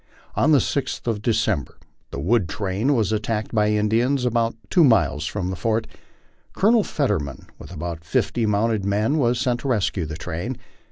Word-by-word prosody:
On 155 - +2
the 150 - +7
6th 135 0 -2
of 115 -3 -1
December 110 - 0 0.3
the - - -6
wood 95 +3 +1
train 100 - 0
was 110 -3 +1
attacked 110 0 -2
by 105 -1 +3
Indians 115 +5 +1
about 115 -1 +1 0.2
two 175 - +5
miles 85 - +3
from 95 -3 -3
the - - -3
fort. 110 +3 0 0.7
Colonel 220 +2 +4
Fetterman, 90 - -2
with - - -11
about 85 -1 -5
fifty 110 +7 0
mounted 105 0 +1
men, 105 +9 +1
was 120 -2 +2
sent 125 -2 0
to - - -5
rescue 100 - 0
the 80 0 -6
train. 90 +9 -4
110 Hz, 170 wpm, -23 LUFS, 95-120 Hz, 0.7 s, the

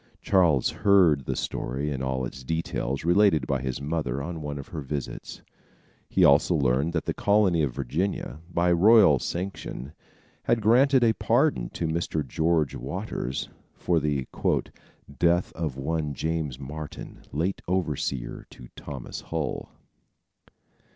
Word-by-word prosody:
Charles 85 -9 +3
heard 85 -9 +4
the - - -2
story 70 +5 -3
in 65 -2 -3
all 65 -1 -1
its 65 +2 -8
details 70 -2 -2
related 90 -5 +4
by 65 0 -1
his 65 -1 -3
mother 70 -3 -2
on 80 +3 -5
one 75 -1 -4
of 70 - -8
her 80 - -5
visits. 70 -1 -6 0.7
He - - +4
also 75 +5 +5
learned 70 +3 +1
that 80 - -1
the - - -1
colony 100 -5 +3
of 70 -5 -1
Virginia, 75 +5 -2
by 85 0 +2
royal 95 - +6
sanction, 85 -6 -5 0.5
had 120 - +2
granted 125 +5 +4
a 115 -1 +4
pardon - - +1
to 85 - -2
Mr. 80 -2 -2
George 80 +1 +1
Waters 65 - -4 0.3
for 85 -2 +1
the 70 -3 -1 0.9
"death 85 +1 +2
of 80 -5 -3
one 75 +1 -2
James 80 -4 -2
Martin, 75 +2 -8
late 85 +7 -1
overseer 75 -8 -2
to - - -13
Thomas 70 -4 -7
Hull." 80 -2 -4
75 Hz, 135 wpm, -26 LUFS, 70-85 Hz, 0.9 s, royal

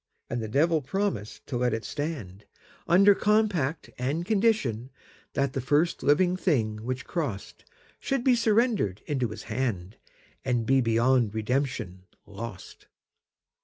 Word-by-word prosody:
And 120 0 -1
the 110 - -4
Devil 155 +7 +2
promised 130 - -3
to 130 - -3
let 125 -1 +1
it 115 - -6
stand, 130 - -5 0.4
Under 195 +4 +6
compact 195 -9 +1
and 145 +7 -1
conditionThat 140 - -1
the 135 - -3
first 150 +7 +1
living 175 +5 +3
thing 120 - 0
which 130 +2 -3
crossedShould 165 - -5
be 260 - +5
surrendered 220 - +1
into 130 -4 -1
his 110 - -8
hand, 110 -5 -3 0.5
And 120 -3 0
be 135 +2 +4
beyond 115 -1 +2
redemption 110 -5 -2 0.2
lost. 105 -1 -9
130 Hz, 125 wpm, -27 LUFS, 110-170 Hz, 0.5 s, Under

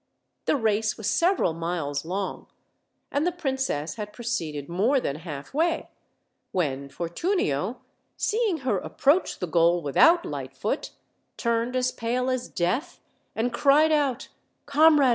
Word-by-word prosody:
The - - +3
race 220 -3 +1
was 220 - -4
sev 360 +3 +3
eral 165 - +1
miles 165 -4 -2
long, 190 +3 -4 0.6
and 285 - +1
the - - +2
princess 265 - -2
had 210 -1 -5
proceeded 165 - -3
more 215 +11 +2
than 140 - -3
halfway, 175 - -2 0.6
when 140 -6 -1
Fortunio, 175 - -1 0.4
seeing 420 - 0
her 210 -7 +2
approach 295 - +1
the - - -2
goal 170 +1 +3
without 330 - +5
Lightfoot, - - -3 0.5
turned 235 +1 0
as 255 0 +1
pale 250 +3 -1
as 255 -1 -2
death, 250 - -1 0.4
and 235 +2 -1
cried 290 +5 +4
out, 280 -5 +1 0.4
"Comrade.. 295 -1 +5
235 Hz, 130 wpm, -26 LUFS, 170-285 Hz, 0.6 s, without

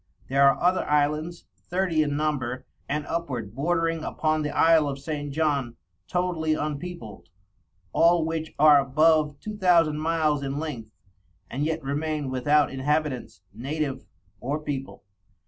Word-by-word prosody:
There 140 +1 +5
are - - 0
other 180 +1 +2
Islands 150 +3 0 0.2
Thirty 180 -3 +1
in 145 -1 0
number, 135 -5 -2 0.2
and 150 +1 -1
upward 125 -11 -4
bordering 165 +3 0
upon 155 0 0
the 150 - -2
Isle 160 0 +4
of 135 - -4
St. 145 0 -5
John, 140 -5 0 0.3
totally 175 -3 0
unpeopled; 145 - -6 0.6
all 170 -1 +4
which 160 0 -3
are 150 -1 +7
above 150 +2 +2
Two 215 0 -6
Thousand 170 -6 +3
miles 155 -2 +1
in 135 0 -3
Lenght, 145 -7 -5 0.6
and 135 +3 -2
yet 160 0 -2
remain 145 0 -2
without 145 +3 +2
Inhabitants, 140 -2 -2
Native, 135 +3 -4 0.3
or 140 +7 -2
People. 135 -7 -6
150 Hz, 135 wpm, -25 LUFS, 140-160 Hz, 0.6 s, are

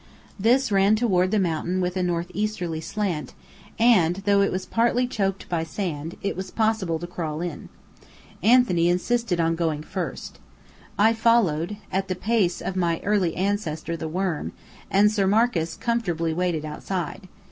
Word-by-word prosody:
This 245 +4 +3
ran 200 +2 +4
toward 190 -5 +2
the 215 - +1
mountain 175 0 0
with 180 0 -1
a 185 - 0
northeasterly 175 -1 -2
slant; 190 -4 -3 0.4
and 210 -8 +4
though 200 -1 +4
it 200 - +2
was 185 - -3
partly 240 +2 +2
choked 195 -6 -2
by 170 -2 -1
sand, 165 -2 -4
it 200 - -1
was 190 +1 -5
possible 215 -7 0
to 170 - -6
crawl 160 -3 -4
in. 170 -3 -5 0.7
Anthony 210 -6 +4
insisted 185 +1 0
on 165 0 +2
going 160 -3 -1
first. 185 +2 -5 0.6
I 220 +3 +5
followed, 210 -6 +2
at 190 +1 -1
the 185 - -2
pace 195 -2 0
of 190 - -4
my 170 -3 0
early 195 -5 +1
ancestor 180 -5 -2
the 160 -1 -5
worm, 180 -1 -2 0.4
and 205 +2 +4
Sir 200 -3 +1
Marcus 200 -6 +1
comfortably 175 -9 -1
waited 170 -3 -1
outside. 180 +4 -5
185 Hz, 155 wpm, -24 LUFS, 170-210 Hz, 0.7 s, I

